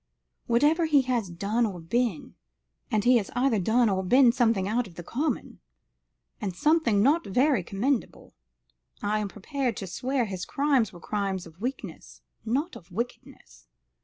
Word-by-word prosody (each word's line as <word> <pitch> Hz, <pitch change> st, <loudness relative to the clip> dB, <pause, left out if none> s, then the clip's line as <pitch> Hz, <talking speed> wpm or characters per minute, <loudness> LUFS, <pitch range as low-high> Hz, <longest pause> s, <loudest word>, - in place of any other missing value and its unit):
Whatever 295 Hz, +8 st, +3 dB
he 290 Hz, -3 st, +4 dB
has 245 Hz, -6 st, -1 dB
done 200 Hz, +7 st, -1 dB
or 200 Hz, -6 st, -2 dB
been 210 Hz, +2 st, -2 dB, 0.6 s
and 215 Hz, -5 st, +1 dB
he 250 Hz, +1 st, +5 dB
has 205 Hz, -4 st, -2 dB
either 245 Hz, -3 st, +2 dB
done 225 Hz, +6 st, +3 dB
or 190 Hz, -2 st, 0 dB
been 250 Hz, +5 st, +5 dB
something 225 Hz, -6 st, +1 dB
out 230 Hz, +2 st, 0 dB
of 175 Hz, -, -16 dB
the 175 Hz, -, -8 dB
common, 285 Hz, -, -3 dB, 0.8 s
and 195 Hz, -4 st, -3 dB
something 235 Hz, -, +3 dB
not 305 Hz, +7 st, +3 dB
very 250 Hz, +3 st, +2 dB
commendable 225 Hz, +8 st, -2 dB, 0.7 s
I 210 Hz, +1 st, +1 dB
am 210 Hz, -, -2 dB
prepared 245 Hz, +5 st, -3 dB
to 195 Hz, -, -4 dB
swear 250 Hz, +7 st, -1 dB
his 190 Hz, -3 st, -5 dB
crimes 275 Hz, -6 st, +1 dB
were 175 Hz, -, -12 dB
crimes 195 Hz, -1 st, -3 dB
of 165 Hz, +3 st, -16 dB
weakness, 170 Hz, -, -6 dB, 0.2 s
not 280 Hz, +10 st, -1 dB
of 175 Hz, -, -13 dB
wickedness. 215 Hz, -, -7 dB
225 Hz, 160 wpm, -27 LUFS, 190-255 Hz, 0.8 s, he